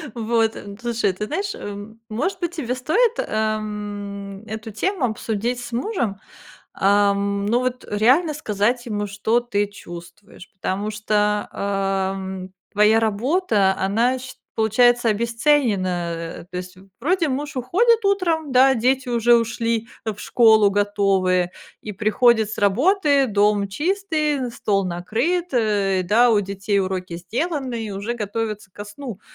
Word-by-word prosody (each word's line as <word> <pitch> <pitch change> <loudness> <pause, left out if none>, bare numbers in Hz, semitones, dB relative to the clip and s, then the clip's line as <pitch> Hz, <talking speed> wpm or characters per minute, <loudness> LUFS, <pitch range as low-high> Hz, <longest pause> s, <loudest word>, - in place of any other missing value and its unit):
Вот, 225 -1 +1
н 200 0 -9
слушай, 235 -4 0
ты 210 +3 -4
знаешь, 395 - -2
м, 205 +2 -8
может 365 - -2
быть, 345 -1 -3
тебе 250 -6 -2
стоит, 360 - +2
эм, 205 -2 -3
эту 220 0 -7
тему 360 - -1
обсудить 230 +1 -2
с 245 0 -8
мужем? 240 - -2 0.6
Ам, 200 0 +2
ну, 235 +4 +2
вот 255 0 -3
реально 260 +10 +3
сказать 240 -1 -1
ему, 210 -2 -2
что 210 +4 0
ты 205 -4 -1
чувствуешь, 185 0 -12
потому 195 +2 -3
что, 210 -1 0
эм, 195 -1 -2 0.2
твоя 210 +2 +4
работа, 220 - +1
она, 230 +7 +1
сч 260 +1 -10 0.2
получается, 240 +2 +3
обесценена. 200 - 0
То 180 - -7
есть, 180 +1 -8 0.2
вроде 335 +4 +1
муж 285 +3 -4
уходит 425 - +2
утром, 335 -7 +1
да, 265 +1 +6
дети 255 +3 +1
уже 240 0 +4
ушли 230 0 0 0.2
в 215 -2 -4
школу 220 -2 +5
готовые, 195 -3 +1 0.3
и 210 - -6
приходит 220 +2 +3
с - - -6
работы, 280 - +3
дом 205 -1 +2
чистый, 305 - -1
стол 200 -4 0
накрыт, 235 - -1
э, 205 -5 +1
да, 230 +6 +4
у 220 - +4
детей 200 +1 -2
уроки 185 -2 -3
сделаны, 255 - -3
и - - -6
уже 200 +4 -3
готовятся 210 -2 -4
ко 205 +2 -9
сну, 210 0 -8
220 Hz, 135 wpm, -22 LUFS, 200-255 Hz, 0.6 s, да